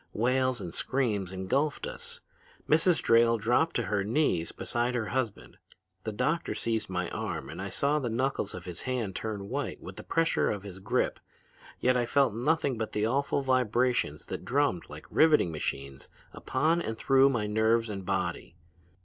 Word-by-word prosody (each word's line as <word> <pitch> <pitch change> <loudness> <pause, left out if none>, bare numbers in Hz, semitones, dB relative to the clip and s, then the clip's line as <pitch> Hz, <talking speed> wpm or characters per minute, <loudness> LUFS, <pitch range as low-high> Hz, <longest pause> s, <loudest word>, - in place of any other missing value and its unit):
Wails 130 +2 +1
and 90 -4 -6
screams 105 -9 -1
engulfed 130 - -1
us. 485 0 -6 0.5
Mrs. 160 +2 +4
Drayle 115 0 +5
dropped 120 +9 +2
to 120 - +1
her 105 0 0
knees 105 - +1
beside 120 +1 -1
her 115 -3 -1
husband. 110 - -3 0.5
The 110 - -1
doctor 155 +10 -1
seized 115 -3 -1
my 90 -1 -1
arm - - -4
and - - -7
I - - -4
saw 145 +2 +1
the 125 -4 -2
knuckles 125 -3 -1
of 90 - -8
his 90 -1 -6
hand 120 -7 -2
turn 105 -3 -4
white - - -3
with - - -10
the - - -7
pressure 165 0 +1
of 100 -2 -3
his 95 -2 -8
grip, 95 - 0 0.6
yet 125 0 +3
I 120 -1 +1
felt 135 -2 +3
nothing 135 +1 0
but 110 - -3
the 105 0 +1
awful 140 +3 0
vibrations 125 - +1
that - - -6
drummed 140 -10 0
like - - -10
riveting 155 - +4
machines 70 -3 -5 0.2
upon 160 +6 +1
and 110 -7 -4
through 135 +2 +5
my 120 -6 0
nerves 110 +2 +2
and 100 -3 -5
body. 90 -2 -2
115 Hz, 175 wpm, -29 LUFS, 100-135 Hz, 0.6 s, Drayle